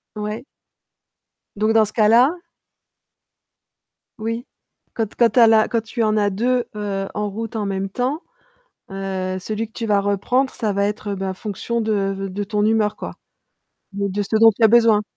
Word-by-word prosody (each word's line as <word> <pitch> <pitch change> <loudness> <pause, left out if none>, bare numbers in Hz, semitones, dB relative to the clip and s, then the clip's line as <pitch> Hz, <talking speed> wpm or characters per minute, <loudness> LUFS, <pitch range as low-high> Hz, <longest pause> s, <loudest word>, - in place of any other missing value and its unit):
Ouais. 210 +2 -4 1.1
Donc 215 +2 +1
dans 220 -1 +5
ce 215 - -7
cas-là 235 +6 +5 1.8
Oui. 230 +2 -4 0.5
Quand 225 -1 -1
t - - -20
quand 235 -1 +5
tu 235 +3 +1
as 230 - +8
la 220 -1 +5
quand 230 - 0
tu 225 +1 -3
en 215 0 +1
as 205 -1 +2
2 240 +5 0
heu, 200 -2 -3
en 210 0 -2
route 225 +2 -6
en 210 - -1
même 195 0 -2
temps, 255 - -2 0.7
heu, 190 -1 -3
celui 215 +4 -4
que 220 - -33
tu 230 - -4
vas 205 -2 +2
reprendre 220 +7 0
ça 215 -3 -2
va 200 +1 +1
être 210 0 -3
heu, - - -2
ben 190 0 -3
fonction 215 +4 -3
de 220 -1 0 0.2
v 195 0 -5
de 200 +2 -4
ton 210 0 -1
humeur 215 -1 +2
quoi? - - -7 0.8
De 200 0 -2
de 200 +2 -2
ce 210 +2 -1
dont 225 0 +8
tu 230 - +2
as - - +8
besoin? 225 -2 +5
215 Hz, 190 wpm, -21 LUFS, 200-225 Hz, 1.8 s, as